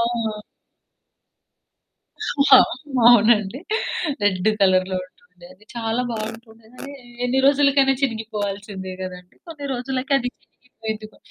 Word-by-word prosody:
ఆ! 230 -2 -2 2.1
ఆ! - - +12 0.5
అవునండి. 220 -1 +4 0.6
రెడ్ 190 -1 +2
కలర్‌లో 185 -1 +3
ఉంటుండే 180 -1 -20
అది. 195 +3 -22
చాలా 225 +1 -1
బావుంటుండే 225 0 -7
కానీ 280 +2 -9 0.3
ఎన్ని 250 +2 +1
రోజులకైనా 280 -1 +4
చినిగిపోవాల్సిందే 205 -5 -4
గదండీ. 180 -1 -9
కొన్ని 305 -4 -7
రోజులకి 255 +2 -3
అది 250 -1 -3 0.2
చినిగిపోయింది. 220 -3 -8
గో - - -21
225 Hz, 100 wpm, -22 LUFS, 200-250 Hz, 2.1 s, ఆ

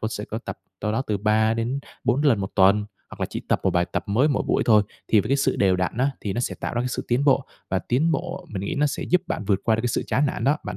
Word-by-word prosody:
tôi 110 - -1
sẽ 105 -2 -5
có 110 - -5
tập - - -7 0.2
đâu 105 - -1
đó 120 - 0
từ 105 - 0
3 110 +2 +2
đến 120 +4 -1 0.3
4 130 +4 +2
lần 125 -9 +3
1 95 - -3
tuần, 100 +2 +4 0.3
hoặc - - -12
là - - 0
chỉ - - -4
tập - - +2
một - - +3
bài 85 0 +2
tập - - -1
mới 120 +9 +3
mỗi 140 - +1
buổi - - +2
thôi. 110 -3 +6 0.3
Thì 110 - +5
với 105 - -5
cái 140 - +3
sự 135 - +1
đều 95 -2 +3
đặn 90 0 -1
á, 135 +2 +2
thì 100 - -3
nó 120 - -2
sẽ - - -2
tạo - - -3
ra 120 - 0
cái 125 - -1
sự 125 - -4
tiến 125 +4 +2
bộ, 135 -1 +3 0.3
và 95 - +2
tiến 145 - +1
bộ 180 +1 -4
mình 100 -3 -4
nghĩ - - -2
nó 150 +1 +2
sẽ 140 - -3
giúp 180 0 +2
bạn 105 - -3
vượt 100 -1 +1
qua 110 - +3
được 115 - -1
cái 120 - 0
sự 120 - -1
chán 145 +3 +2
nản - - -3
đó. 145 +3 +3
Bạn - - -5
115 Hz, 325 wpm, -24 LUFS, 105-135 Hz, 0.3 s, thôi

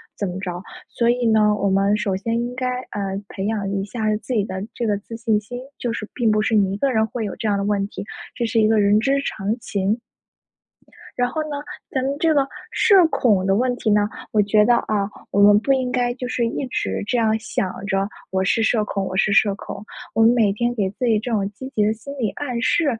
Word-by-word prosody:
怎 200 - -2
么 180 +1 -5
着。 180 -2 -4 0.3
所 235 0 +1
以 245 0 +1
呢， 215 -2 +4
我 200 -1 0
们 195 +2 +2
首 195 -1 -1
先 230 +4 -1
应 240 +1 -3
该， 255 0 -2 0.2
啊， 205 - -4 0.3
培 195 0 -5
养 210 -3 -1
一 195 -1 -1
下 215 +1 -1
自 250 - -5
己 210 - +2
的 190 - -5 0.2
这 240 - -2
个 210 -2 +2
自 225 +2 -9
信 225 -2 +1
心， 245 +4 -7 0.2
就 240 - -2
是 220 -2 -4
并 235 -3 +1
不 215 - +2
是 225 - 0
你 195 -2 +3
一 - - -3
个 275 +5 +1
人 220 -2 +2
会 225 0 -4
有 200 - -4
这 225 - -3
样 205 -1 +2
的 200 - -1
问 205 -1 +1
题， 195 -1 -7 0.3
这 240 - -1
是 225 0 +2
一 215 - +4
个 220 0 +3
人 205 +1 +4
之 275 +4 +2
常 210 -4 -2
情。 205 +2 -1 1.2
然 245 0 +1
后 310 +5 -2
呢， 295 -1 -4 0.3
咱 260 - -1
们 275 +2 -1
这 325 -1 +3
个 280 -2 +2 0.2
社 390 -5 +5
恐 210 -11 +2
的 195 0 +3
问 245 +3 +1
题 240 -2 -2
呢， 205 0 +3 0.2
我 215 - +4
觉 210 +1 +4
得， 240 - +5
啊， 210 -3 0 0.2
我 200 - +3
们 205 0 +7
不 270 +4 +2
应 260 -2 0
该 245 -1 +1
就 250 -1 -5
是 245 -1 0
一 260 - -3
直 250 - -2
这 245 - +1
样 220 -1 +2
想 195 -3 -3
着 195 0 0 0.2
我 190 0 0
是 225 +4 +2
社 220 -1 +2
恐 195 -1 -2
我 185 - -4
是 200 +1 +3
社 205 0 +4
恐。 205 - -8 0.3
我 225 - +2
们 225 +1 +7
每 220 -5 +3
天 240 +3 0
给 200 -4 0
自 250 - -3
己 225 -3 +3
这 235 +3 -5
种 200 -3 0
积 260 +6 -8
极 210 - +3
的 215 - +2
心 275 +6 -9
理 225 -4 +1
暗 250 0 -4
示， 330 +6 +2
220 Hz, 270 characters per minute, -22 LUFS, 200-245 Hz, 1.2 s, 们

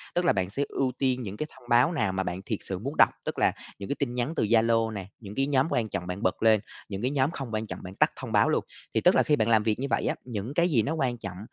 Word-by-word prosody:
Tức 175 0 +1
là 170 - +5
bạn 95 -2 -1
sẽ 135 +8 -1
ưu 130 -2 0
tiên 130 -2 +1
những 105 -3 -6
cái 155 - -3
thông 125 -2 -17
báo 120 +6 +5
nào 110 - 0
mà 95 0 -1
bạn 90 0 -4
thiệt 110 - -2
sự 95 -2 -4
muốn 135 +8 -5
đọc. - - +7 0.2
Tức - - -3
là - - +4 0.3
những 100 - -6
cái 140 - 0
tin 125 -4 -1
nhắn 125 +5 -1
từ - - +1
Zalo 115 +1 +3
nè, 100 -3 -6
những 105 -2 -9
cái 135 0 +1
nhóm 135 0 +2
quan 115 -3 0
trọng 90 -3 -4
bạn 90 +2 -4
bật 95 - 0
lên, 110 -1 +6 0.3
những 100 -1 -4
cái 125 +3 0
nhóm 140 +1 +1
không 135 -8 -6
quan 110 0 -2
trọng - - -6
bạn 95 +1 -8
tắt - - +3
thông - - -7
báo - - +4
luôn. - - +1 0.3
Thì - - +2
tức - - +5
là - - +5
khi 150 - +3
bạn 110 -5 +1
làm 110 -2 +4
việc 110 0 0
như 135 - -1
vậy - - 0
á, - - 0
những 115 +1 -4
cái 170 +3 +3
gì 130 -9 +3
nó 145 - -1
quan 130 -6 -1
trọng, 100 -5 -7
115 Hz, 320 wpm, -27 LUFS, 105-135 Hz, 0.3 s, đọc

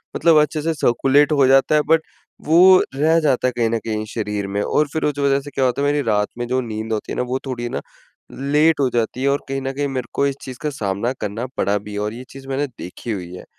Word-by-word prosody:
मतलब 165 -1 +4
अच्छे 150 +1 -1
से 165 +2 0
सर्कुलेट 140 +1 +3
हो 140 -3 +4
जाता 135 +3 +4
है 150 - +4
बट 160 0 +5 0.4
वो 180 +4 +7
रह 160 +4 +3
जाता 135 -5 +1
है - - 0
कहीं 115 -2 +2
न 115 - 0
कहीं 110 -1 -2
शरीर 105 -3 -3
में। 100 +1 -2
और 150 +7 +1
फ़िर 160 - -2
उस 145 -1 -1
वजह 140 -1 +2
से 145 +1 -10
क्या 135 -1 0
होता 125 +2 0
है 145 - +2
मेरी 145 0 +1
रात 105 -1 +2
में 120 - -3
जो 130 +1 0
नींद 110 -1 -4
होती 105 - -4
है - - -3
ना - - +1
वो 130 - 0
थोड़ी 120 -2 -4
ना - - -4 0.5
लेट 150 +4 +2
हो 135 -2 +2
जाती 120 +2 -1
है। - - +2
और 140 +1 0
कहीं 135 0 -2
न 135 0 -3
कहीं 145 +1 -1
मेरे 130 -3 -4
को 140 - +1
इस 140 - -2
चीज़ 130 -2 -8
का 150 - -1
सामना 110 -2 -2
करना 105 +3 -3
पड़ा 100 +1 +1
भी 105 +1 -8
है 105 - -3
और 105 +1 -2
ये 120 +2 -8
चीज़ 135 0 -12
मैंने 135 +2 -1
देखी 115 -2 -8
हुई 90 -4 -5
है। - - -10
130 Hz, 270 wpm, -20 LUFS, 110-145 Hz, 0.5 s, वो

